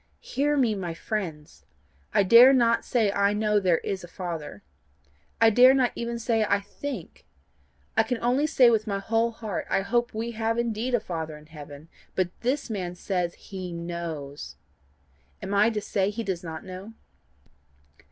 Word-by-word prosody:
Hear 290 +3 0
me, 245 -5 +3
my 180 -5 -4
friends: 165 -7 -5 0.5
I 200 - +4
dare 235 +7 +8
not 230 -3 +3
say 220 -5 +1
I 200 0 +2
know 210 0 +2
there 180 -4 +3
is 190 +2 -4
a - - -8
Father. 165 - -6 0.8
I 225 0 +6
dare 255 +4 +7
not 255 -2 +2
even 235 0 -4
say 225 -1 +1
I 200 -1 +2
think, 205 - -8 0.7
I - - +5
can 230 +2 -1
only 255 +5 +2
say 255 -6 +5
with 220 -1 +1
my 200 -2 -1
whole 225 +3 +1
heart 220 -4 -5
I - - +2
hope 240 +4 0
we 230 +2 -3
have 225 0 -1
indeed 235 +1 0
a - - +2
Father 160 -6 -5
in 150 - -16
heaven; 150 -1 -11 0.3
but 185 -2 0
this 265 +4 -1
man 185 -6 -4
says 180 -2 -2
HE 185 -3 -7
KNOWS. 170 -4 -6 0.8
Am 200 - -5
I 205 +2 +5
to 220 -2 -2
say 200 -1 0
he 225 +3 -4
does 185 -4 -3
not 160 0 -7
know? 190 +4 -9
205 Hz, 170 wpm, -26 LUFS, 175-235 Hz, 0.8 s, dare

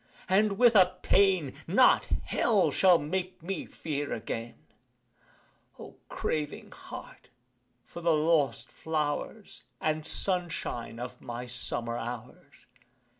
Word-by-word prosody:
and 200 +2 +3
with 240 -1 +5
a 185 -2 +5
pain 185 -8 +3
Not 215 +10 +5 0.2
Hell 210 -5 +2
shall 185 -2 +5
make 180 +3 -4
me 185 -1 -4
fear 145 -2 -4
again 115 +1 -5 1.2
O - - -11
craving 150 -2 -3
heart, - - -11 0.6
for 170 - -9
the 170 0 +2
lost 150 -5 +1
flowers 160 +6 -3 0.2
And 155 0 -1
sunshine 170 -11 -1
of 125 +1 -7
my 120 +1 -6
summer 120 -1 -2
hours! 120 +1 -8
160 Hz, 110 wpm, -29 LUFS, 125-185 Hz, 1.2 s, with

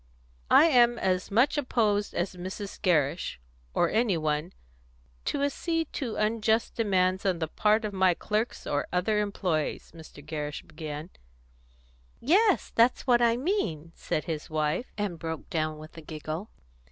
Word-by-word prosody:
"I - - +7
am 240 -6 +5
as 185 -3 0
much 245 +8 +3
opposed 215 -6 0
as 180 +2 -2
Mrs. 190 +3 -7
Gerrish 160 - +1 0.4
or - - +3
any 220 -5 +2
one 155 +2 -1 0.7
to 280 - -1
acceding 325 +3 -1
to 240 -6 -3
unjust 220 +1 +1
demands 190 -4 +1
on 190 -3 +1
the 160 -1 -2
part 215 +6 +2
of 210 - -4
my 190 -2 +3
clerks 215 +6 -2
or 145 - -1
other 200 +4 +1
employees," 180 -7 -2
Mr. 160 -3 -13
Gerrish 150 -2 -4
began. 155 +1 -7 1.1
"Yes, 385 - +3
that's 235 +2 +3
what 240 -2 +4
I 235 0 +4
mean," 240 - -2
said 155 - -3
his 155 -3 -5
wife, 155 +8 -1
and 200 -5 -3
broke 160 0 -5
down 155 -3 -1
with 155 +1 -12
a 165 - -9
giggle. 155 +5 -6
190 Hz, 150 wpm, -28 LUFS, 160-230 Hz, 1.1 s, I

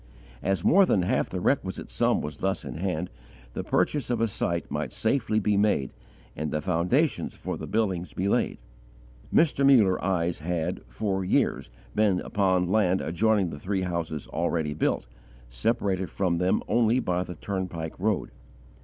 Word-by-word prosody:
As 95 -3 0
more 195 +2 +6
than 95 - +3
half - - 0
the - - -3
requisite - - -1
sum - - +2
was 75 - -6
thus 95 0 -2
in - - -5
hand, 90 -1 -2 0.4
the - - -3
purchase 145 -6 0
of 120 - 0
a 115 - +2
site 85 -4 -2
might - - -3
safely 110 -2 +1
be 105 -1 +1
made 100 - +2 0.4
and 75 +1 -3
the 75 - -1
foundations 95 - 0
for - - -4
the - - -7
buildings 95 -5 -1
be 95 - -2
laid. - - +1 0.7
Mr. 150 -4 +3
Muller 115 -9 +5
eyes 90 -2 0
had, 85 +1 -2
for 95 - -2
years, 90 - +1 0.2
been 105 -4 +2
upon 95 -3 +1
land 95 -1 +2
adjoining 100 +1 +1
the 70 - -7
three 95 +3 -1
houses 85 -4 -3
already 80 -2 -1
built, 75 - 0 0.5
separated 95 - 0
from 90 -3 0
them 90 +1 +1
only 115 +2 +3
by 90 -6 0
the 90 -1 -6
turnpike 90 -3 -4
road. 105 +1 0
95 Hz, 160 wpm, -27 LUFS, 85-105 Hz, 0.7 s, more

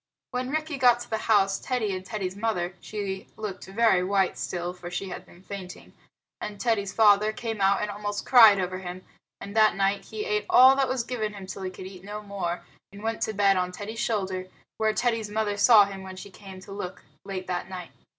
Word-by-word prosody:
When 250 0 -2
Rikki 310 0 -2
got 245 -2 +5
to - - -8
the 220 - 0
house, 195 -2 +4
Teddy 225 -7 -1
and 185 - -6
Teddy's 190 -1 -4
mother 200 -5 -1
(she 200 -3 -5
looked 210 -3 -6
very 195 -2 +3
white 195 0 +1
still, 175 0 -4
for 175 -1 -9
she 190 +2 -4
had - - -8
been 175 - -18
fainting) 190 -2 -9 0.5
and 205 -1 -6
Teddy's 210 -5 0
father 210 0 +5
came 225 -1 -5
out 195 +1 +3
and 210 - -2
almost 205 0 -4
cried 220 -6 +8
over 185 0 -2
him; 185 0 -8 0.3
and 200 +1 -8
that 215 -1 +5
night 195 0 0
he 215 -1 -5
ate 210 0 -1
all 260 +1 +8
that 270 -2 +1
was 255 -2 0
given 225 -3 -3
him 195 -1 -8
till 190 +1 -7
he 190 - -3
could 185 0 -10
eat 185 -1 -10
no 210 +1 -7
more, 180 -4 -4 0.3
and 200 +1 -11
went 225 0 -2
to 220 - -1
bed 200 -1 +3
on 180 0 0
Teddy's 210 +4 -7
shoulder, 190 -5 -1 0.3
where 220 0 +2
Teddy's 225 -1 0
mother 210 -1 -1
saw 205 0 +7
him 195 -1 -7
when 190 0 -8
she 195 +2 -10
came 190 -1 -11
to 195 - -12
look 195 -2 -6 0.2
late 185 -2 -5
at 175 +1 -3
night. 180 -2 -7
200 Hz, 220 wpm, -26 LUFS, 190-220 Hz, 0.5 s, cried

